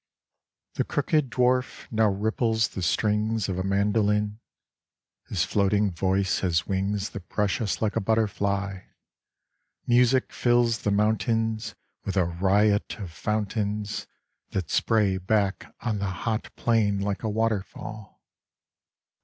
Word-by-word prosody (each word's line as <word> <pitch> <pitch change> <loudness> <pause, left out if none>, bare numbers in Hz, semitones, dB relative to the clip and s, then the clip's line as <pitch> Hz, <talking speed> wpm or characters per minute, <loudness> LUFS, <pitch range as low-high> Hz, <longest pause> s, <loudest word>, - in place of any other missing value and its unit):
The - - 0
crooked 155 -7 0
dwarf 125 +2 +1
now 110 -1 +3
ripples 110 +2 +1
the 95 - -6
strings 105 +4 +1
of 95 -2 -2
a - - -1
mandoline. 105 +1 +1 0.9
His - - 0
floating 100 0 +2
voice 95 +2 +1
has 85 -3 +1
wings 100 +1 -1
that 95 -2 -9
brush 105 0 0
us 95 -5 -1
like 105 - 0
a - - +2
butterfly; 100 -2 0 1.1
Music 125 +1 +3
fills 120 -2 +2
the - - -1
mountains 110 +1 0 0.3
With 100 0 -3
a 90 - +4
riot 100 +4 +2
of 95 -6 -7
fountains 105 +2 -2 0.4
That 90 -5 -3
spray 105 -4 +2
back 100 +1 0
on 110 -4 -1
the 100 -1 -1 0.2
hot 110 -1 -1
plain 105 -4 +2
like 100 -1 -2
a 110 - -1
waterfall. 110 -1 -3
105 Hz, 125 wpm, -26 LUFS, 100-110 Hz, 1.1 s, a